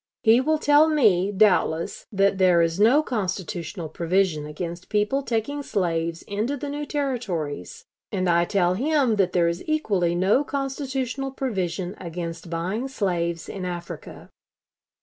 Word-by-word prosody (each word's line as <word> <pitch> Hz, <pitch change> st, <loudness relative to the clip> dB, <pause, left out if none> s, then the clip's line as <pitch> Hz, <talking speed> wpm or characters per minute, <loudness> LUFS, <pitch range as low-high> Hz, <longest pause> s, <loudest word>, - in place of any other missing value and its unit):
He 225 Hz, +3 st, +6 dB
will 310 Hz, +3 st, +2 dB
tell 300 Hz, +1 st, +5 dB
me, 205 Hz, -, +3 dB
doubtless, 190 Hz, -4 st, +2 dB
that 195 Hz, -1 st, +2 dB
there 180 Hz, -2 st, +5 dB
is 165 Hz, +2 st, -1 dB
no 250 Hz, +9 st, +5 dB
constitutional 185 Hz, -, -3 dB
provision 170 Hz, -1 st, 0 dB
against 170 Hz, +3 st, -6 dB
people 210 Hz, +6 st, +1 dB
taking 265 Hz, +3 st, -2 dB
slaves 165 Hz, -8 st, -1 dB
into 220 Hz, +8 st, -2 dB
the 285 Hz, +1 st, -5 dB
new 290 Hz, +1 st, -4 dB
Territories, 200 Hz, -, -3 dB, 0.3 s
and 185 Hz, -2 st, -1 dB
I 170 Hz, 0 st, +3 dB
tell 180 Hz, -1 st, +2 dB
him 265 Hz, 0 st, +1 dB
that 185 Hz, -2 st, +2 dB
there 175 Hz, -2 st, +3 dB
is 170 Hz, +1 st, -2 dB
equally 200 Hz, -, +1 dB
no 195 Hz, +10 st, +3 dB
constitutional 270 Hz, -1 st, -3 dB
provision 190 Hz, -9 st, -3 dB
against 170 Hz, -1 st, -6 dB
buying 185 Hz, +9 st, -2 dB
slaves 170 Hz, -9 st, -2 dB
in 195 Hz, -, -6 dB
Africa.... 175 Hz, -1 st, -7 dB
195 Hz, 140 wpm, -24 LUFS, 170-265 Hz, 0.3 s, He